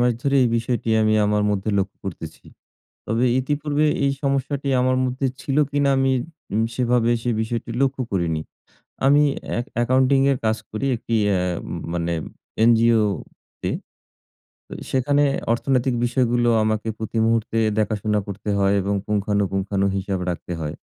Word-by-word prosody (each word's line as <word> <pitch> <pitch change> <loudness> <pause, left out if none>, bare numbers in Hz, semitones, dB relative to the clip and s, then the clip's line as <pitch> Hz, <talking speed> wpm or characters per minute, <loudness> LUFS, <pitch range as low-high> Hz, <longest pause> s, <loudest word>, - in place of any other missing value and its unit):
মাস 120 0 +3
ধরেই 140 -1 +3
এই 120 - +3
বিষয়টি 115 0 -2
আমি 110 0 +3
আমার 105 0 +1
মধ্যে 100 +1 -1
লক্ষ্য 100 +1 -2
করতেছি। 80 -4 -7 0.6
তবে 115 +3 +1
ইতিপূর্বে 145 +2 0 0.2
এই 140 - +2
সমস্যাটি 140 0 -1
আমার 130 0 +2
মধ্যে 130 +2 -1
ছিল 135 +2 -2
কিনা 140 -1 +2
আমি 135 0 +2 0.4
উ - - +1 0.2
সেভাবে 120 -1 +2
সে 120 - 0
বিষয়টি 115 +1 -3
লক্ষ্য 135 -1 0
করিনি। 85 -4 0 0.7
আমি 145 +2 +5 0.3
এ্যা - - -1 0.2
অ্যাকাউন্টিংয়ের 130 +2 +3
কাজ 110 0 +2
করি 110 +6 -3
একটি 115 0 -3
এ্যাম 90 -3 0 0.3
মানে 85 0 -1 0.5
এনজিওতে। 115 -4 +1 1.0
তো, - - -14 0.2
সেখানে 145 +2 +2 0.3
অর্থনৈতিক 130 +1 +1
বিষয়গুলো 120 -1 +1
আমাকে 110 +1 -1
প্রতি 110 +1 -3
মুহূর্তে 115 0 0 0.2
দেখাশোনা 105 -1 0
করতে 100 +1 -5
হয় 100 0 +3
এবং 100 +1 -1
পুঙ্খানুপুংখানু 100 -1 0
হিসাব 95 0 -2
রাখতে 90 0 -5
হয়। 75 -1 -4
115 Hz, 140 wpm, -22 LUFS, 100-130 Hz, 1.0 s, আমি